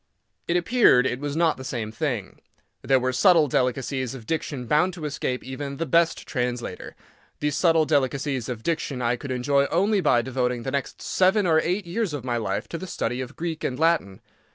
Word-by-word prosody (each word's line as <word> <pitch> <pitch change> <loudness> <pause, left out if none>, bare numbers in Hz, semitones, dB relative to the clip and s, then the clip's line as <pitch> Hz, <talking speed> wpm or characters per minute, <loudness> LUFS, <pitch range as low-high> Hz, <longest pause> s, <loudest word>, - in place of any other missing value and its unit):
It 175 - +2
appeared 175 - +4
it 125 -1 -1
was 145 0 -4
not 165 -1 +2
the 130 - -8
same 115 -4 -4
thing. 120 -7 -3 0.4
There 135 -1 +3
were 130 0 -1
subtle 165 +3 +5
delicacies 130 0 -1
of 120 -4 -10
diction 145 -3 -3
bound 170 +8 +2
to 160 -4 -6
escape 130 -3 -3
even 140 +1 -6
the 165 - -2
best 165 +3 +2
translator. 125 -2 -4 0.4
These 150 -1 -1
subtle 165 0 +3
delicacies 140 -3 0
of 115 -3 -5
diction 155 -5 -2
I 120 +1 +2
could 130 +3 -8
enjoy 140 +2 +2
only 200 +4 +2
by 120 -7 +3
devoting 125 -2 -1
the 135 - -3
next 140 -1 -4
seven 190 +2 +2
or 160 -2 +4
eight 185 +3 -1
years 180 -2 -2
of 130 -4 -6
my 120 -2 -1
life 105 -1 -2
to 165 - -5
the 190 - -7
study 125 -7 -2
of 130 +2 -7
Greek 165 -2 -4
and 130 - -2
Latin. 160 - +1
140 Hz, 200 wpm, -25 LUFS, 125-165 Hz, 0.4 s, subtle